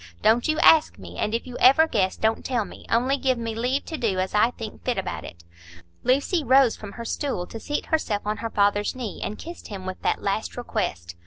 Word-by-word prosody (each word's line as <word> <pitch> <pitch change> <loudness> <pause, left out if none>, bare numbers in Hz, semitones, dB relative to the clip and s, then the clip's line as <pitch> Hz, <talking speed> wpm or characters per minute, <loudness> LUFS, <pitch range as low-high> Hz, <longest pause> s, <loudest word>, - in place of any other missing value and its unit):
Don't 230 +2 +4
you 310 0 +1
ask 320 -2 +6
me. - - -10
And 210 +2 0
if 230 - -3
you 250 -1 -8
ever 295 +5 +6
guess, 195 -10 0
don't 220 +1 0
tell 240 -5 -1
me. - - -13
Only 255 +4 +2
give 260 -2 +1
me 230 -1 -3
leave 250 +5 -1
to 320 - -5
do 210 -5 0
as 185 0 -1
I 210 +3 +4
think 225 -3 -9
fit 250 -2 -1
about 190 - -3
it." 85 0 -11 0.6
Lucy 280 +6 +1
rose 260 -2 +5
from 205 -2 -9
her 235 - -7
stool 255 -9 -2
to 225 - -8
seat 295 +6 -3
herself 225 -10 -1
on 210 +1 -1
her 230 +2 -4
father's 205 +1 +1
knee, 240 -6 -6
and 210 - -4
kissed 340 +1 -9
him 195 -3 -7
with 185 0 -6
that - - 0
last 200 +4 -2
request. 85 - -3
230 Hz, 230 wpm, -24 LUFS, 205-260 Hz, 0.6 s, ask